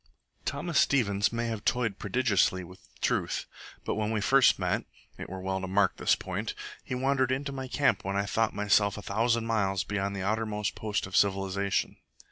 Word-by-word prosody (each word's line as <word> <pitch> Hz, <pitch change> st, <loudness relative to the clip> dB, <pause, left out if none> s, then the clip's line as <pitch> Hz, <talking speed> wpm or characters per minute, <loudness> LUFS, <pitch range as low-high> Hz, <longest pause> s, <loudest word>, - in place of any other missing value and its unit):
Thomas 170 Hz, -4 st, 0 dB
Stevens 105 Hz, -7 st, +2 dB
may 115 Hz, 0 st, -2 dB
have 115 Hz, -3 st, -3 dB
toyed 115 Hz, -5 st, 0 dB
prodigiously 100 Hz, -7 st, +1 dB
with 90 Hz, +2 st, -13 dB, 0.2 s
truth, -, -, 0 dB, 0.4 s
but -, -, 0 dB
when 105 Hz, 0 st, -1 dB
we 110 Hz, -1 st, 0 dB
first 130 Hz, +6 st, +5 dB
met -, -, -1 dB, 0.3 s
(it -, -, -7 dB
were 95 Hz, +1 st, -6 dB
well 95 Hz, 0 st, -2 dB
to 95 Hz, -, -4 dB
mark 95 Hz, 0 st, +2 dB
this -, -, +3 dB
point), -, -, -4 dB, 0.3 s
he 125 Hz, -, -4 dB
wandered 130 Hz, 0 st, +1 dB
into 140 Hz, +2 st, -1 dB
my 135 Hz, -1 st, -5 dB
camp 140 Hz, +2 st, +1 dB
when 95 Hz, +1 st, -2 dB
I 100 Hz, 0 st, +1 dB
thought 110 Hz, +1 st, 0 dB
myself 100 Hz, 0 st, +2 dB
a 105 Hz, -, -7 dB
thousand 115 Hz, +2 st, +1 dB
miles 100 Hz, -4 st, +1 dB
beyond 100 Hz, -1 st, -2 dB
the 95 Hz, -, -3 dB
outermost 105 Hz, 0 st, -1 dB
post 105 Hz, -2 st, -2 dB
of 95 Hz, -, -7 dB
civilization. 100 Hz, 0 st, +1 dB
105 Hz, 185 wpm, -29 LUFS, 100-120 Hz, 0.4 s, first